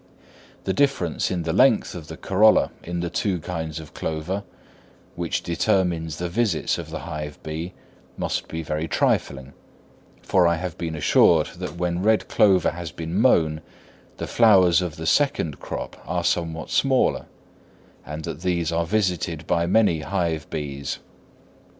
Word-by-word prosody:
The 95 - -1
difference 115 - +1
in 90 -2 -2
the 80 0 -1
length 130 -4 +4
of 80 -4 -8
the - - -8
corolla 105 +3 +4
in 85 0 -3
the 85 - -2
two 95 -1 0
kinds 80 -2 -4
of 80 -2 -11
clover, 80 +6 -3 0.7
which - - -2
determines 85 -3 0
the 90 - -2
visits 100 -3 0
of - - -7
the - - -5
hive 75 -2 -6
bee, 80 +4 -5 0.4
must - - -2
be 80 0 -5
very 75 +1 -2
trifling; 70 -3 0 0.7
for 90 -2 +3
I 85 - +3
have 90 0 -5
been 80 -2 -4
assured 75 - +4
that - - -6
when 90 0 -1
red 110 +2 +2
clover 95 -4 +4
has 85 -1 -6
been 80 0 -6
mown, 80 -11 +3 0.6
the - - -4
flowers 95 -7 +5
of 85 -4 -3
the 80 - -6
second 80 - +1
crop - - -6
are 90 +1 -1
somewhat 80 -2 -1
smaller, 135 -2 +2 0.8
and 75 +1 -7
that 75 - -6
these 85 -3 0
are 85 0 0
visited 90 -5 -1
by 85 0 +1
many 95 -4 +3
hive 80 -1 -2
bees. 70 -2 -4
85 Hz, 155 wpm, -24 LUFS, 80-95 Hz, 0.8 s, flowers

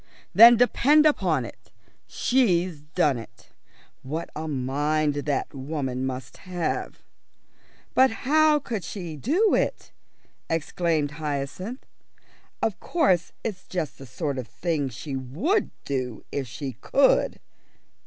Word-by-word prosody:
"Then 235 +2 +9
depend 285 +5 +4
upon 175 - +2
it, - - -13 0.4
she's 185 - +1
done 150 -4 +1
it. 115 - -14 0.5
What 155 +5 -5
a 160 +1 -4
mind 145 +2 0
that 145 0 -2
woman 130 -2 -3
must 130 -1 -6
have!" 180 -2 -4 0.9
"But 260 +1 +6 0.2
how 310 +2 +5
could 235 -9 -4
she 170 -2 -6
do 330 - +2
it?" - - -1 0.6
exclaimed 165 -2 0
Hyacinth. 155 - -4 0.8
"Of 215 - 0
course 190 - +1
it's 195 -5 -5
just 175 -5 -4
the 135 - -10
sort 140 +1 -3
of 125 - -6
thing 160 -6 -2
she 135 +3 -6
would 155 - 0 0.2
do 130 -5 -3
if 135 -2 -3
she 135 +3 -5
could." 275 -1 +3
155 Hz, 120 wpm, -25 LUFS, 140-215 Hz, 0.9 s, Then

